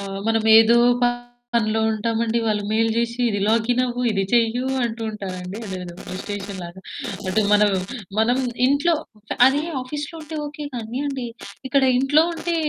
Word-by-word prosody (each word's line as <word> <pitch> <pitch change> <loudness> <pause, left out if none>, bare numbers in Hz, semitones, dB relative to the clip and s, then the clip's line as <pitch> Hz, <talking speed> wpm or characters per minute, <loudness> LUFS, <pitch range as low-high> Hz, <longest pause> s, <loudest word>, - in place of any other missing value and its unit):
ఆ! - - -5 0.2
మనం 225 -1 +2 0.2
ఏదో 230 +1 +6 0.8
పనిలో 220 -1 +2
ఉంటామండి. 225 +1 0
వాళ్ళు 210 -1 0
మెయిల్ 225 +1 +2
జేసి 235 +1 -1
ఇది 205 -2 -1
లాగినవ్వు, 245 +2 +1
ఇది 195 -2 0
చెయ్యు 235 +1 +2 0.2
అంటూ 230 0 -4
ఉంటారండి. 185 -2 -6
అదేదో 180 -2 -6 0.2
డిస్టేషన్‌ 200 0 -5
లాగా. 175 +2 -10 0.5
అటు 215 +4 +2
మనం 210 0 +5 0.5
మనం 245 +4 +3 0.3
ఇంట్లో, 285 +5 +3 0.5
అది 285 +3 +2 0.2
ఆఫీస్‌లో 295 +5 -6
ఉంటే 310 +1 -7
ఓకే 295 0 -7
కానీ 235 +2 -4
అండి 265 -3 -3 0.4
ఇక్కడ 275 0 +3 0.2
ఇంట్లో 290 +4 +4
ఉంటే 340 +1 -2
225 Hz, 140 wpm, -22 LUFS, 210-255 Hz, 0.8 s, ఏదో